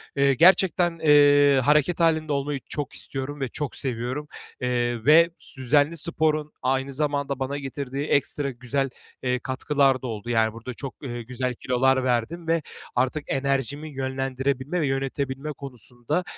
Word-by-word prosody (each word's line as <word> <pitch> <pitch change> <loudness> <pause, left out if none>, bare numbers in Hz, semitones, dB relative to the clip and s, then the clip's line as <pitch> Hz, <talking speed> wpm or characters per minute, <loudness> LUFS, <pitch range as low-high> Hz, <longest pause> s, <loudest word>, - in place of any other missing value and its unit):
eee, 140 0 +4
gerçekten, 175 +2 +4
eee, 145 -2 +6
hareket 150 +5 +3
hâlinde 155 -2 +2
olmayı 140 0 -1
çok 145 -3 -4
istiyorum 140 +2 -5
ve 135 - 0
çok 145 +1 -4
seviyorum, 130 +3 -3 0.3
eee, 120 -2 -1
ve 165 +3 +7 0.3
düzenli 145 +5 +2
sporun 155 -1 0
aynı 135 +1 0
zamanda 140 -1 -1
bana 135 +2 -2
getirdiği 140 0 -4
ekstra 140 0 0
güzel, 130 +2 -2 0.3
eee, 125 0 0
katkılar 135 +1 +1
da 130 - -4
oldu. 110 0 -6
Yani, 110 -2 +2
burada 115 +2 -7
çok, 135 +1 -7
ııı, 120 -3 -5
güzel 125 +2 -3
kilolar 130 +2 +2
verdim 130 +7 -1
ve 165 -1 +2 0.3
artık 130 +4 0
enerjimi 140 +2 -1
yönlendirebilme 135 +3 -2
ve 145 - +1
yönetebilme 135 +2 -2
konusunda, 130 - -4
135 Hz, 145 wpm, -25 LUFS, 130-150 Hz, 0.3 s, ve